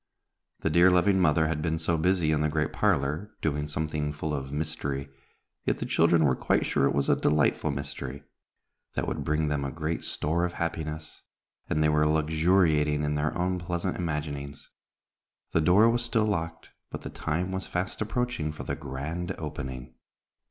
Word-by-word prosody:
The 80 - 0
dear, 85 +3 +6
loving 95 +2 +4
mother 80 -2 +4
had 75 -1 -1
been 80 0 0
so 85 +1 +1
busy 85 -1 +2
in 75 -1 +2
the 75 - +2
great 75 0 -1
parlor, 75 +10 0
doing 75 -1 -1
something 75 0 -2
full 75 +1 -3
of 70 -2 -4
mystery, 70 -2 -3 0.5
yet - - 0
the - - -4
children 80 -1 +4
were 65 -3 +3
quite - - +1
sure 70 - +2
it - - 0
was 70 -1 +1
a - - +5
delightful 75 +1 +2
mystery, 70 -1 -5 0.7
that - - -1
would - - -2
bring 75 0 +1
them 75 -1 0
a 70 - -2
great 80 +2 -3
store 80 +4 -1
of 90 0 -1
happiness, 80 -2 -4 0.5
and 75 0 +2
they 75 - +4
were 75 0 +3
luxuriating 80 -1 +3
in 75 0 0
their 75 +1 -1
own 90 +1 0
pleasant 85 +1 -2
imaginings. 75 -4 -4 0.8
The 80 - +2
door 95 +8 +6
was 120 +1 +2
still 115 -2 +1
locked, 80 -5 -3 0.2
but - - -6
the - - -7
time 85 +4 -2
was 95 0 -4
fast 90 +3 -3
approaching 110 -8 -1
for 75 - -8
the - - -3
grand 80 +4 -4
opening. 65 -5 -6
80 Hz, 180 wpm, -28 LUFS, 75-85 Hz, 0.8 s, dear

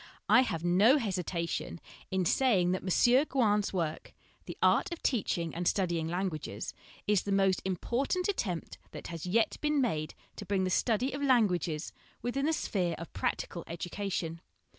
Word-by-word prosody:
I 255 - +7
have 170 -10 -2
no 200 +10 +5
hesitation 180 - -3 0.3
in 190 -1 0
saying 190 -5 +3
that 185 - -1
M. 240 - +4
Gouin's 210 -6 +2
work 165 -4 -3 0.3
(The - - -7
Art 400 - +3
of 340 - -6
Teach 235 -9 +1
ing 170 -2 -3
and 175 +1 -2
Studying 170 -4 +1
Languages) 165 - -3
l - - -30 0.2
is 205 -3 +3
the 200 - -4
most 195 -2 +3
important 245 - -1
attempt 195 - -3
that - - -7
has 170 0 -6
yet 220 +5 +2
been 300 -1 +1
made 155 - -1 0.2
to 205 - -6
bring 195 -2 +1
the 185 - 0
study 240 +6 +1
of 280 - -4
languages 180 - +1 0.3
within 275 +4 0
the 320 - +2
sphere 180 - -1
of 170 - -9
practical 170 - -2
edu 170 +1 -6
cation. 175 -5 -3
190 Hz, 170 wpm, -31 LUFS, 170-240 Hz, 0.3 s, I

